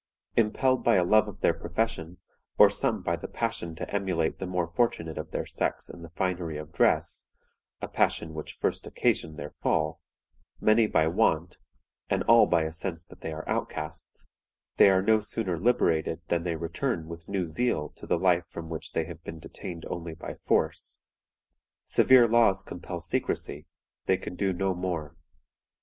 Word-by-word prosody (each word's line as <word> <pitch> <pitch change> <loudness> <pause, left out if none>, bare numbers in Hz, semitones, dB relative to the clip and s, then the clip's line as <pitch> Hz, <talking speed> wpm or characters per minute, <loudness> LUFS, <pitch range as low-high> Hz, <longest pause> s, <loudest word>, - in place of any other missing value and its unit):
Impelled 130 +4 +2
by 120 - +4
a 90 - +4
love 110 +4 +4
of 100 -2 -9
their - - +4
profession, 90 -2 -3 0.4
or - - +8
some - - 0
by - - +1
the - - -7
passion 85 -1 -3
to - - -5
emulate 90 -5 0
the 95 - -3
more 90 -1 0
fortunate 85 -3 0
of 80 0 -6
their - - -3
sex - - -2
in 85 - -12
the 85 - -9
finery 85 -2 -2
of 75 +1 -8
dress - - +1 0.6
(a - - -1
passion 80 -1 0
which 80 -1 -7
first - - -1
occasioned 80 -1 0
their 75 +1 -6
fall), 80 0 0 0.6
many 110 +1 +4
by 80 - +3
want, 80 - +1 0.5
and - - +1
all 115 0 +6
by 85 -2 +3
a 80 0 -3
sense 85 0 -4
that - - -16
they 80 - -4
are 80 +1 -6
outcasts, 75 +2 -4 0.5
they - - +8
are 95 -1 +3
no 110 +2 +4
sooner 105 -5 -2
liberated 80 -7 +2
than 85 - +1
they 85 -1 -2
return 85 - -2
with 85 0 -9
new 95 -3 0
zeal 80 -1 -1
to - - -13
the - - +2
life 90 -2 +2
from 80 -1 -7
which 80 -1 -6
they - - 0
have - - -9
been 80 - -7
detained 85 +1 -8
only 85 -1 -5
by 80 - -7
force. - - -1 0.9
Severe 130 -2 +6
laws 110 -4 +4
compel 90 -1 -7
secrecy; 85 -2 -2 0.4
they 95 - +4
can 95 - -7
do 95 +1 0
no 95 +1 0
more. 85 -4 -4
85 Hz, 175 wpm, -28 LUFS, 80-100 Hz, 0.9 s, or